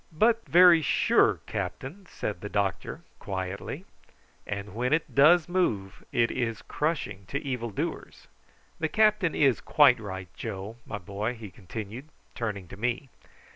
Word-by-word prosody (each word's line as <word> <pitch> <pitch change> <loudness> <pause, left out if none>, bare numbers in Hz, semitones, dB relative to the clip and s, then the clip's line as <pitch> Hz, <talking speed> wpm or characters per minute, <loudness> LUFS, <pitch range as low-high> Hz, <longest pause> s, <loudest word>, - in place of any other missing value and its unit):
"But 225 +8 +2
very 175 -1 +7
sure, - - +3
captain," 180 +9 -5
said 100 -4 -4
the 105 - -5
doctor 100 -3 -2 0.2
quietly. 95 0 -5 0.6
"And 100 -1 -5
when 125 +5 0
it 165 - 0
does 155 +4 +6
move 115 - -1
it 115 -1 +2
is 115 -3 -2
crushing 140 - -2
to 140 - -2
evil 125 -4 -2
doers. 100 - -5 0.5
The 160 - 0
captain 210 -4 +3
is 135 -4 +3
quite 135 -5 +5
right, 95 -4 -7
Joe, 100 +4 -6
my 105 - -4
boy," 105 +5 -4
he 110 -4 -10
continued, 110 - -8 0.2
turning 105 -5 -4
to - - -10
me. 125 +4 -2
115 Hz, 140 wpm, -28 LUFS, 100-155 Hz, 0.6 s, very